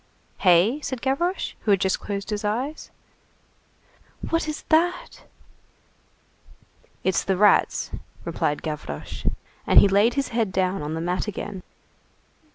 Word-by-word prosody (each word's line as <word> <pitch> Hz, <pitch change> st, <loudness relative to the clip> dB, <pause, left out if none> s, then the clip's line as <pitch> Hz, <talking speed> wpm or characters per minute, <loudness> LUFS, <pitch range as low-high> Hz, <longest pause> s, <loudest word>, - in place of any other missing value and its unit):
"Hey?" 190 Hz, -, +4 dB
said 260 Hz, -4 st, -4 dB
Gavroche, 340 Hz, +8 st, -1 dB
who -, -, -5 dB
had 200 Hz, -2 st, +5 dB
just 190 Hz, 0 st, +1 dB
closed 200 Hz, +1 st, -5 dB
his 210 Hz, 0 st, -2 dB
eyes. 250 Hz, +9 st, -3 dB, 1.4 s
"What 330 Hz, -1 st, +1 dB
is 305 Hz, -, -5 dB
that?" 340 Hz, +3 st, +1 dB, 1.8 s
"It's 190 Hz, -, +1 dB
the 190 Hz, -1 st, 0 dB
rats," 205 Hz, +1 st, +3 dB, 0.3 s
replied 150 Hz, -, -1 dB
Gavroche. 150 Hz, -, -6 dB, 0.4 s
And -, -, +8 dB
he -, -, +6 dB
laid 205 Hz, +5 st, +3 dB
his 275 Hz, -1 st, -1 dB
head 225 Hz, -4 st, 0 dB
down 185 Hz, -1 st, 0 dB
on 150 Hz, +2 st, -3 dB
the 160 Hz, -, -3 dB
mat 180 Hz, +4 st, -1 dB
again. 205 Hz, -1 st, -5 dB
205 Hz, 130 wpm, -24 LUFS, 185-265 Hz, 1.8 s, And